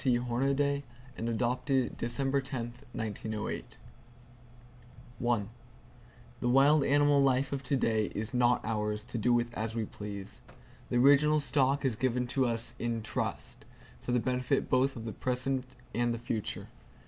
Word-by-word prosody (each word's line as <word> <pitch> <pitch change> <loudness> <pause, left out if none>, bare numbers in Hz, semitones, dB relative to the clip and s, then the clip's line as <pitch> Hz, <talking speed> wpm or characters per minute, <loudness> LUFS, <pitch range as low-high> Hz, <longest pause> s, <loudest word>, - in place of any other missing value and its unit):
T. 125 -3 +3
Hornaday 135 +4 +1 0.3
and 115 - -3
adopted 125 +3 0
December 135 +4 0
10, 125 -3 -5 0.2
1908 110 -1 -4 1.4
The 120 +1 -5
wild 140 +3 +5
animal 145 0 +4
life 135 0 +2
of 140 - -2
to 140 +1 0
day 110 -3 +2
is 110 +4 -3
not 125 0 +3
ours, 105 -1 -1
to 115 - -5
do 120 +3 +2
with 120 0 +1
as 110 0 -3
we 115 -2 -1
please. 100 -1 -7 0.5
The 120 - +1
original 145 +4 +5
stock 140 -1 +1
is 125 -4 +1
given 125 +1 0
to 130 0 +2
us 115 0 -1
in 115 -2 -2
trust, 110 - -4 0.4
for - - -4
the 125 - +3
benefit 125 +2 0
both 130 +1 +3
of 115 -2 -7
the 110 - -4
present 130 +1 -1 0.3
and 120 0 +1
the 115 - -1
future. 115 -2 -4
120 Hz, 150 wpm, -31 LUFS, 115-135 Hz, 1.4 s, wild